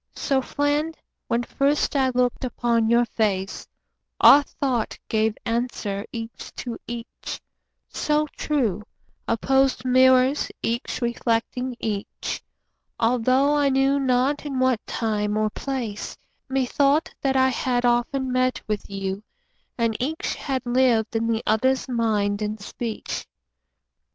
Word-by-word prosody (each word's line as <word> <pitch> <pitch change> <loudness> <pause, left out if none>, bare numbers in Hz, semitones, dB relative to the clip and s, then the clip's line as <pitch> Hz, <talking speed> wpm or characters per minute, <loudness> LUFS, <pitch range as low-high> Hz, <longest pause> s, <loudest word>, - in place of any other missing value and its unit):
So, 270 -2 +1
friend, 290 +4 -1 0.3
when 235 +1 +1
first 280 +4 +1
I 265 -2 +3
look'd 250 0 0
upon 235 -2 +1
your 235 +1 +4
face, 200 -4 -1 0.5
Our 290 - +9
thought 260 -5 -2
gave 220 -1 +1
answer 230 -3 -2
each 230 -1 -7
to 240 -3 -5
each, 235 0 -6 0.5
so 300 0 0
true— 235 -10 0 0.5
Opposed 265 +3 +2
mirrors 255 +2 +4
each 235 +2 -2
reflecting 240 +2 -1
each— 210 -2 -4 0.6
Altho' 255 +4 +3
I 290 -1 +3
knew 270 +1 +3
not 265 +2 +1
in 285 -3 -4
what 255 -3 +2
time 210 -2 -1
or 215 0 +1
place, 245 -7 -4 0.3
Methought 275 +3 +2
that 270 -1 +1
I 260 0 +4
had 245 0 0
often 245 +2 +1
met 255 0 +1
with 210 -1 -3
you, 195 0 -3 0.6
And 230 -2 +1
each 305 +6 -2
had 265 -3 -3
lived 240 -3 +2
in 225 0 +1
the 230 0 0
other's 260 +6 +2
mind 215 -4 0
and 210 +1 -2
speech. 220 +2 -5
245 Hz, 125 wpm, -24 LUFS, 225-265 Hz, 0.6 s, Our